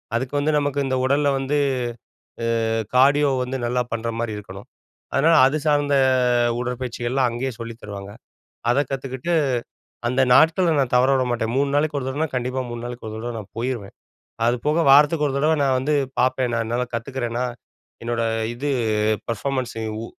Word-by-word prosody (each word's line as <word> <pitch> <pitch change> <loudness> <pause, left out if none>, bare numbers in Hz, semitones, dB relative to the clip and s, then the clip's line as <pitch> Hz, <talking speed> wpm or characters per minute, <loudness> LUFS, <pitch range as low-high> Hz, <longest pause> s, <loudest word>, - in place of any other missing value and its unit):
அதுக்கு 130 +3 -2
வந்து, 150 +2 +1
நமக்கு 145 -1 -1
இந்த 130 0 0
உடல்ல 145 +2 +2
வந்து, 135 +2 -1 1.1
ஆ - - -1 0.2
கார்டியோ 140 +2 +5
வந்து 130 +1 -3
நல்லா 125 +1 0
பண்ற 115 0 -3
மாரி 115 -2 -2
இருக்கணும். 100 -1 -10 0.5
அதனால 165 +4 +4
அது 135 +3 +2
சார்ந்த 145 -1 +2 0.6
உடற்பயிற்சிகள்லாம் 125 +1 -1
அங்கயே 125 +3 -3
சொல்லித் 115 0 -8
தருவாங்க. 100 -1 -8 0.6
அதக் 140 +2 +1
கத்துக்கிட்டு, 135 +4 -3 0.7
அந்த 125 +2 +1
நாட்கள 165 +4 +4
நான் 130 -3 0
தவறவிடமாட்டேன். 125 -3 +2
3 140 0 +2
நாளைக்கு 150 0 +1
ஒரு 130 - -5
தடவனா, 145 +4 -1
கண்டிப்பா 125 +1 -1
3 120 0 -6
நாளுக்கு 120 -2 -7
ஒரு 110 - -7
தடவ 120 +1 -5
நான் 105 -2 -11
போயிருவேன். 115 -4 -4 0.5
அது 120 - +3
போக 155 +3 +3
வாரத்துக்கு 150 +2 +5
1 135 - -3
தடவ 155 +3 +2
நான் 135 -2 +2
வந்து 145 +4 0 0.2
பாப்பேன். 130 -1 +1
நான் 115 -1 -2
நல்லா 125 +1 -1
கத்துக்கறேனா? 120 0 -3 0.6
என்னோட 120 0 -1 0.3
இது, 140 +5 -3 0.6
பெர்ஃபாமன்ஸூ 125 0 -2 0.2
உ - - -5
130 Hz, 155 wpm, -22 LUFS, 120-140 Hz, 1.1 s, கார்டியோ